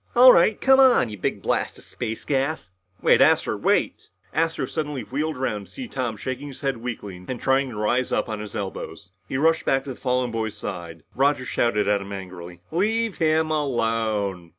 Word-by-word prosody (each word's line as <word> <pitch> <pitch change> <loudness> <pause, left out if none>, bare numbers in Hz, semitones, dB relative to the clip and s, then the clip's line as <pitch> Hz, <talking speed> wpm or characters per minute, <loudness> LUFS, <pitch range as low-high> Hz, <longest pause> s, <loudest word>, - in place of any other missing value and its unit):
"All 250 +1 +9
right 195 +5 +4
come 265 0 +5
on, 255 - +5
you 105 - -7
big - - -2
blast - - -1
of - - -15
space 110 0 -5
gas!" 135 - -1 0.3
"Wait, - - +5
Astro... - - +4
wait!" - - 0 0.2
Astro 165 0 0
suddenly 150 -4 -4
wheeled 150 +3 -3
around 105 -6 -3
to - - -16
see 260 -2 -6
Tom 125 - -3
shaking 130 +6 -5
his 135 - -10
head 135 -3 -1
weakly 105 -6 -6
and 130 -2 -4
trying 135 0 +2
to 120 - -8
rise 120 +4 0
up - - 0
on 110 -1 -4
his 105 -1 -8
elbows. 95 -1 -6 0.2
He 130 - -1
rushed 160 +3 +3
back 135 0 +1
to 135 - -6
the - - -7
fallen 125 -1 -1
boy's 110 -2 -3
side. 85 -6 -7
Roger 135 0 +2
shouted 105 -5 +1
at 100 -1 +2
him 100 +1 -7
angrily, 90 -2 -8
"Leave 220 +4 0
him 160 -1 +2
alone!" 115 - -1
125 Hz, 195 wpm, -24 LUFS, 105-150 Hz, 0.3 s, All